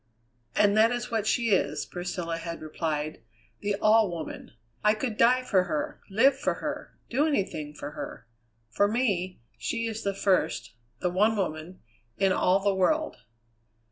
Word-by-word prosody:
"And 205 Hz, 0 st, +4 dB
that 220 Hz, +1 st, +6 dB
is 245 Hz, -1 st, -3 dB
what 220 Hz, -2 st, 0 dB
she 230 Hz, 0 st, +2 dB
is!" 190 Hz, -, +1 dB
Priscilla 175 Hz, -2 st, -4 dB
had 170 Hz, 0 st, -6 dB
replied, 155 Hz, -1 st, -3 dB, 0.4 s
"the 205 Hz, 0 st, -1 dB
All 215 Hz, 0 st, +4 dB
Woman. 165 Hz, -8 st, -7 dB, 0.3 s
I 210 Hz, 0 st, +4 dB
could 220 Hz, 0 st, -3 dB
die 250 Hz, +3 st, +4 dB
for 190 Hz, -7 st, +2 dB
her, 155 Hz, -4 st, -3 dB
live 245 Hz, +8 st, +4 dB
for -, -, -1 dB
her, -, -, -6 dB
do 280 Hz, +6 st, +2 dB
anything 160 Hz, -, -2 dB
for 145 Hz, 0 st, -6 dB
her. 130 Hz, -5 st, -7 dB, 0.5 s
For 205 Hz, -, +3 dB
me, 200 Hz, -, -1 dB, 0.2 s
she 230 Hz, 0 st, -2 dB
is 225 Hz, -1 st, -3 dB
the 200 Hz, -1 st, -2 dB
first, 125 Hz, -, +1 dB, 0.3 s
the 180 Hz, -, +1 dB
one 210 Hz, +4 st, +3 dB
woman, 170 Hz, -1 st, -3 dB, 0.4 s
in 195 Hz, -1 st, +3 dB
all 185 Hz, +1 st, +3 dB
the 200 Hz, 0 st, +2 dB
world." 310 Hz, +12 st, +1 dB
195 Hz, 160 wpm, -28 LUFS, 170-225 Hz, 0.5 s, that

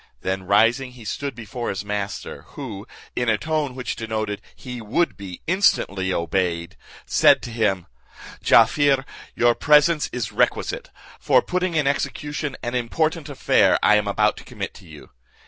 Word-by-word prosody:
Then 95 Hz, 0 st, -3 dB
rising, 120 Hz, +6 st, +3 dB
he 120 Hz, -3 st, -13 dB
stood 140 Hz, +5 st, -4 dB
before 115 Hz, +1 st, -5 dB
his 100 Hz, +1 st, -4 dB
master, 105 Hz, -1 st, -4 dB, 0.2 s
who, 110 Hz, -8 st, -7 dB, 0.3 s
in 120 Hz, -1 st, 0 dB
a 110 Hz, -, +3 dB
tone 155 Hz, -3 st, -2 dB
which 125 Hz, -1 st, -4 dB
denoted 110 Hz, -2 st, -3 dB
he 125 Hz, -2 st, -8 dB
would 125 Hz, +11 st, 0 dB
be 95 Hz, -3 st, -9 dB
instantly 100 Hz, -, +2 dB
obeyed, 85 Hz, -1 st, -1 dB, 0.3 s
said -, -, +4 dB
to 120 Hz, -, -6 dB
him, 105 Hz, -6 st, 0 dB, 0.6 s
"Jaaffier, 140 Hz, -2 st, +4 dB, 0.3 s
your 120 Hz, 0 st, +4 dB
presence 150 Hz, +3 st, +4 dB
is 120 Hz, -4 st, -3 dB
requisite, -, -, 0 dB, 0.3 s
for -, -, +3 dB
putting 180 Hz, -1 st, -1 dB
in 150 Hz, -2 st, +2 dB
execution 145 Hz, +1 st, -2 dB
an 120 Hz, -, -3 dB
important 155 Hz, +6 st, -1 dB
affair 140 Hz, -, +3 dB
I 105 Hz, -, +6 dB
am 105 Hz, -1 st, +1 dB
about 105 Hz, +1 st, +2 dB
to -, -, -10 dB
commit -, -, -6 dB
to -, -, -15 dB
you. -, -, -13 dB
120 Hz, 155 wpm, -23 LUFS, 100-145 Hz, 0.6 s, I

